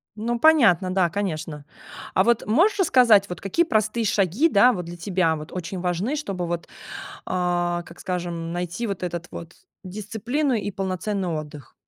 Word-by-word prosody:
Ну 235 +3 -2
понятно, 215 - +4
да, 185 -2 +2
конечно. 160 -6 -4 0.5
А 190 - +4
вот 235 +1 +2
можешь 360 - +3
рассказать, 235 - +5
вот 180 - -6
какие 330 - +1
простые 220 -3 0
шаги, 200 - +2
да, 245 -3 +5
вот 180 -7 -4
для 170 +1 -8
тебя 175 -2 +1
вот 155 0 -9
очень 185 +1 -5
важны, 180 - -1
чтобы, 195 -12 -3
вот, 170 0 -4 0.6
а, 175 -1 0
как 170 - -14
скажем, 175 -2 -4
найти 175 +6 -3
вот 195 -3 -4
этот 175 -1 -4
вот 170 0 -9 0.3
дисциплину 220 +9 -2
и 210 -3 -1
полноценный 190 0 -2
отдых? 150 -4 -6
185 Hz, 160 wpm, -24 LUFS, 175-220 Hz, 0.6 s, рассказать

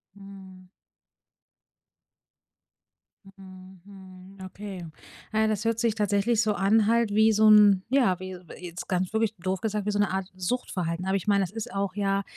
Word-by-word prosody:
Mhm. 190 -2 -13 2.6
Mhm, 190 -1 -15
mhm, 190 -1 -14
okay. 190 -2 -8 0.5
Na 220 - +1
ja, 220 - +3
das 215 0 -2
hört 230 0 0
sich 230 -2 +1
tatsächlich 210 +2 +1
so 215 -2 +1
an, 205 +2 +2
halt 230 -2 +2
wie 220 +1 +4
so 215 +1 +4
'n 205 -3 +6
ja, 240 -9 +2
wie 185 0 -7
s 180 - -9
äh, 180 - -10
jetzt 175 +1 -8
ganz 185 0 -1
wirklich 220 -1 0
doof 185 +1 -3
gesagt, 210 -2 -2
wie 210 - 0
so 205 - -2
'ne 205 - +1
Art 190 -1 -3
Suchtverhalten. 180 -4 -3
Aber 190 +1 0
ich 195 - -3
meine, 200 -1 +3
es 185 - -5
ist 225 -2 -7
auch, 195 -1 -2
ja, 195 -1 0
195 Hz, 180 wpm, -26 LUFS, 185-215 Hz, 2.6 s, n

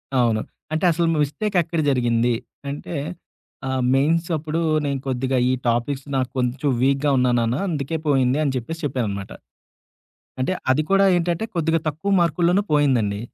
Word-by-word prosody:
అవును. 115 -4 +2 0.3
అంటే 160 +3 0
అసలు 170 +1 +1 0.2
మిస్టేక్ 195 +8 -2
ఎక్కడ 165 +1 -3
జరిగింది? 120 -2 +2 0.4
అంటే 145 +4 -6 0.7
ఆహ్, 130 -1 -1
"మెయిన్స్ 165 +5 +2
అప్పుడు 155 +2 -2 0.3
నేను 140 -1 -1
కొద్దిగా 130 0 -1
ఈ - - +2
టాపిక్స్ 120 +4 0
నాకు 130 -1 0
కొంచెం 125 +3 0
వీక్‌గా 135 +2 +2
ఉన్నా 125 0 +3
నాన్న 115 +1 0
అందుకే 155 -2 -2
పోయింది" 135 -1 +3
అని 145 - +1
చెప్పేసి 165 +7 -4
చెప్పాననమాట. 105 -8 -3 1.1
అంటే 130 - 0 0.2
అది 140 +4 +3
కూడా 195 0 +5
ఏంటంటే, 175 +3 0
కొద్దిగా 165 -1 +1
తక్కువ 155 +7 -3
మార్కుల్లోనే 175 +3 +2
పోయిందండి. 125 -9 +2
140 Hz, 145 wpm, -22 LUFS, 125-165 Hz, 1.1 s, కూడా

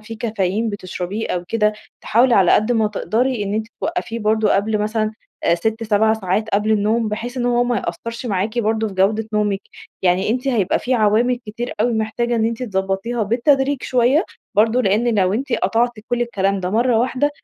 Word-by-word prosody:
في 215 +1 -9
كافيين 215 -1 -1
بتشربيه 200 +1 -5
أو 175 -1 -2
كده، 210 -2 +2 0.3
تحاولي 240 +2 +3
على 190 -3 +4
قَدّ 215 +4 +3
ما 220 -2 +2
تقدري 230 +3 -1
إنّ 200 0 -2
أنتِ 220 0 -2
توقّفيه 325 -9 -3
برضه 215 -1 +2
قبل 215 +2 +1
مثلًا، 215 +1 -1 0.3
آآ 170 - +4
6، 220 +6 -2
7 220 0 +3
ساعات 215 +1 -1
قبل 210 +1 +1
النوم، 215 +2 +1
بحيث 240 +4 -5
إنّ 245 -1 -1
هو 245 0 +2
ما 245 -1 0
يأثرش 230 +2 -5
معاكِ 215 +2 -1
برضه 220 0 0
في 195 - -9
جودة 210 +4 +1
نومِك. 205 -2 0 0.4
يعني 185 +2 +2
أنتِ 255 +4 -1
هيبقى 215 -8 +1
في 255 +1 -1
عوامل 230 +3 +3
كتير 235 +4 -5
أوي 240 +2 +2
محتاجة 230 +2 -1
إنّ 220 - +1
أنتِ 230 +2 -2
تضبطيها 195 +2 -2
بالتدريج 270 +5 +1
شويَّة، 255 +7 +2 0.3
برضه 225 +4 +3
لإنّ 220 +4 +2
لو 185 0 +2
أنتِ 265 +4 -2
قطعتِ 230 +4 +1 0.2
كل 240 0 +1
الكلام 195 -4 -1
ده 180 0 -2
مَرَّة 235 +1 +2
واحدة، 260 +4 +1
220 Hz, 190 wpm, -20 LUFS, 205-240 Hz, 0.4 s, على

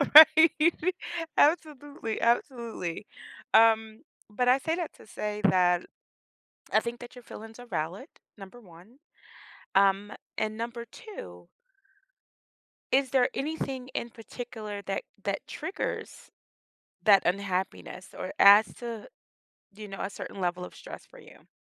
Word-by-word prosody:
Right? 315 +1 +10 0.9
Absolutely. 290 -6 +1
Absolutely. 235 - -1 0.5
Um, 220 -1 +4 0.3
but 245 +4 -1
I 255 +2 +6
say 320 +4 -1
that 345 -3 -4
to - - -17
say 210 0 -4
that 180 -1 +3 0.9
I - - +5
think 235 +1 -4
that 240 +1 -11
your 245 - -12
feelings 225 +1 -11
are 245 - -11
valid, 170 -3 -4 0.3
number 195 +5 -11
1. 190 +5 -17 0.8
Um, 195 +1 +3 0.3
and 215 0 -2
number 235 0 -5
2 90 - -11 1.4
is 265 -1 +3
there 255 -2 +3
anything 270 -3 -3
in 235 - -3
particular 220 -3 -8
that 195 0 -3 0.2
that - - -2
triggers 380 - -5 0.7
that 200 -3 +6
unhappiness 185 0 -2
or 185 - -5
adds 205 +2 +8
to, 235 -3 -7 0.7
you 210 0 -9
know, 195 - -7
a 195 - -2
certain 200 - -8
level 180 0 -1
of - - -13
stress - - -10
for - - -17
you? - - -17
220 Hz, 130 wpm, -28 LUFS, 195-250 Hz, 1.4 s, Right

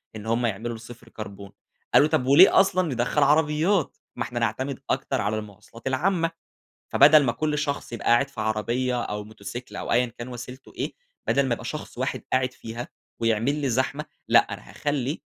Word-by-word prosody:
إن 105 -1 -8
هم 115 +2 +1
يعملوا 115 +2 -2
الصفر 120 +1 -12
كربون. 100 -3 -9 0.4
قالوا: 145 - +7
"طب 155 -4 +1
وليه 145 +9 +8
أصلًا 185 -2 +3
ندخّل 125 +5 +1
عربيات؟ 155 +4 +2 0.2
ما - - -2
إحنا 120 - -4
نَعتمد 125 +4 -1
أكتر - - 0
على 105 +2 0
المواصلات 105 +4 -11
العامة. 165 +5 +1 0.6
فبدل 150 +1 +7
ما 120 - +1
كُل 150 +2 -1
شخص 145 -4 -3
يبقى 115 - -6
قاعد 120 +4 +4
في 135 -5 -8
عربية، 120 +3 0
أو 105 0 -4
موتسيكل، 110 +3 -8
أو - - -3
أيًا 125 +1 +4
كان 120 +1 -9
وسيلته 125 +1 -9
إيه، - - -3 0.4
بَدَل 140 0 +3
ما 125 - 0
يبقى - - -10
شخص - - -6
واحد - - -2
قاعد 130 0 +2
فيها، 115 0 -7 0.3
ويعمل 115 +4 +1
لي 140 - 0
زحمة. 130 +5 0 0.2
لأ - - +7 0.2
أنا - - -13
هاخلّي 145 0 -2
125 Hz, 180 wpm, -25 LUFS, 115-145 Hz, 0.6 s, وليه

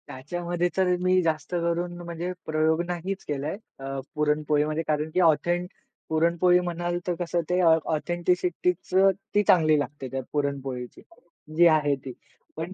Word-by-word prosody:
त्याच्यामध्ये 175 +6 -3
तर 185 -1 +3
मी 185 0 +3
जास्त 160 -2 -2
करून 170 +1 -1
म्हणजे 170 +1 -4
प्रयोग 155 +1 +1
नाहीच 180 +2 -4
केलाय. 150 +5 -3 0.2
अ, 135 0 -4 0.2
पुरणपोळीमध्ये 150 +1 +1
कारण 150 0 0
की - - +1
ऑथेंट 175 +2 +2 0.4
पुरणपोळी 170 +3 +3
म्हणाल, 175 0 -2
तर 180 - +1
कसं 175 0 -1
ते 180 +1 +2
ऑथेंटिसिटीच 175 +2 +1 0.4
ती 205 - +5
चांगली 155 -3 +5
लागते. 140 -1 -5
त्या 135 0 -2
पुरणपोळीची, 135 -4 -3 0.5
जी 170 +1 +7
आहे 150 -3 +3
ती. 130 - -6 0.4
पण 165 +4 -4
165 Hz, 135 wpm, -26 LUFS, 150-175 Hz, 0.5 s, जी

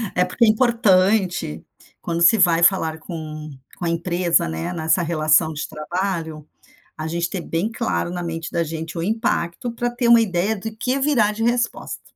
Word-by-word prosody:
é 180 - +3
porque 230 +6 +2
é - - +3
importante, 200 - +2 0.4
quando 170 0 -3
se 170 +6 +6
vai 170 -3 +4
falar 160 -4 +2
com 155 -3 -7 0.3
com - - -8
a - - +1
empresa, 170 - +1
né? 80 - -4
Nessa 160 +1 +1
relação 160 -1 +2
de 150 - -4
trabalho, 160 -1 -4 0.5
a 155 - -4
gente 170 +1 -2
ter 190 - -3
bem 170 +7 -2
claro, 225 -6 -2
na 175 0 -4
mente 165 -1 -5
da 170 -1 0
gente, 160 +1 -6
o - - -2
impacto 215 0 -1
pra 240 +1 -2
ter 240 0 -1
uma 235 -1 +7
ideia 200 +1 0
do 220 +2 -7
que 255 +4 -1
virá 265 -7 +2
de 225 +2 -3
resposta. 240 0 -1
175 Hz, 185 wpm, -21 LUFS, 165-220 Hz, 0.5 s, uma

